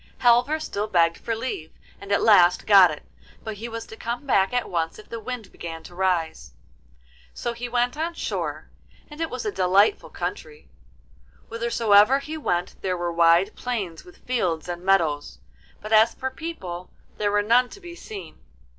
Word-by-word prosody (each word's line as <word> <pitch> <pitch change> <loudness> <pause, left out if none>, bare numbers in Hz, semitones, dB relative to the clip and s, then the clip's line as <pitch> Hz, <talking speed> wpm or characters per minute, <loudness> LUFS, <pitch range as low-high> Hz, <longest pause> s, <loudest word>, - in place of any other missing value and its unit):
Halvor 245 +6 +4
still 210 -8 -3
begged 170 -4 +2
for 230 - -3
leave, 220 -9 -5 0.3
and 200 0 -9
at 200 - +2
last 180 -5 +5
got 195 -4 +8
it, 150 - -7 0.4
but 220 -2 -6
he 230 +3 -6
was 230 0 -6
to - - -11
come 235 +5 -5
back 195 -8 +2
at 245 -1 -1
once 165 -2 -2
if 215 - -14
the 230 - -5
wind 235 -1 -7
began 165 -1 -8
to 175 - -12
rise. 170 - -1 0.8
So 240 - -3
he 240 +1 -6
went 245 +1 0
on 330 +2 -3
shore, - - -4 0.4
and 300 +2 -8
it 325 - -1
was 250 -2 -5
a 210 - 0
delightful 190 - +2
country; 460 -2 -6 0.8
whithersoever 230 0 +4
he 305 +3 -6
went 180 - -2
there 185 -1 -1
were 175 0 -2
wide 170 +4 +4
plains 200 -10 -4
with 180 - -18
fields 180 -11 -1
and 175 0 -5
meadows, 160 - +1 0.4
but 215 +1 -4
as 220 +1 +5
for 260 0 -4
people, 190 - -7 0.3
there 205 -1 +1
were 205 0 +2
none 245 +4 +3
to 400 - -12
be 350 -3 -10
seen. 195 - -10
210 Hz, 180 wpm, -24 LUFS, 175-245 Hz, 0.8 s, got